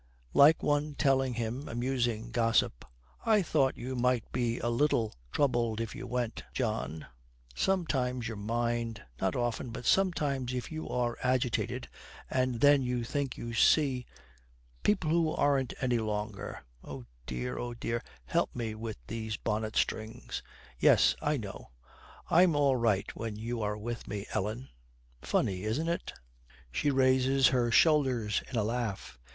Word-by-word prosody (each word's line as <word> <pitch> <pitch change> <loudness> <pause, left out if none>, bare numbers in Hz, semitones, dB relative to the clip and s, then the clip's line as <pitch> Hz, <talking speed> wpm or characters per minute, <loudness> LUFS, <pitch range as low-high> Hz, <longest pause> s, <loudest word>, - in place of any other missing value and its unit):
Like 150 +3 +6
one 145 0 +1
telling 135 -3 +2
him 120 +4 -3
amusing 120 -2 -1
gossip, 115 - +1 0.4
'I 215 -3 +4
thought 140 -5 +1
you 130 +2 -4
might 125 -1 +1
be 120 -1 0
a - - -2
little 120 -3 +1 0.2
troubled 120 -5 +1
if 115 -1 -3
you - - -7
went, 125 -1 -2
John. 110 - -2 0.5
Sometimes 130 - 0
your 115 - -4
mind 115 +1 -2 0.2
not 95 -1 +1
often, 120 0 -1
but 115 +1 -7
sometimes 140 -9 +1
if 125 +3 -4
you 155 0 -5
are 120 -1 -1
agitated 125 -2 0 0.4
and 130 -2 0
then 145 -1 +6
you 125 -1 -1
think 140 +1 -2
you 115 0 -5
see 130 +1 +3 0.7
people 185 -7 +2
who 165 -1 +2
aren't 135 -3 +2
here - - -17
any 125 -2 +2
longer. 105 -2 -4 0.2
Oh 70 -4 -8 0.2
dear, 60 0 -3
oh 120 -1 -4
dear, 115 0 -2 0.2
help - - 0
me 115 -3 -3
with 110 0 -6
these 110 -2 -4
bonnet 110 0 -2
strings.' 110 +1 -2 0.4
'Yes, - - +5
I 150 0 +1
know. 100 -5 -7 0.6
I'm 175 -1 +5
all 140 -2 +4
right 110 -5 +1
when 115 -2 -4
you 115 +2 -4
are 105 0 -1
with 115 +2 -5
me, 100 0 -4
Ellen. 110 +6 -2 0.5
Funny, 95 -1 0
isn't 115 +11 -1
it?' 170 - -3 0.6
She 110 - +1
raises 130 0 +4
her 125 -2 +2
shoulders 125 -7 +3
in 130 - -3
a 110 - +2
laugh. 105 - -3
120 Hz, 150 wpm, -31 LUFS, 110-135 Hz, 0.7 s, Like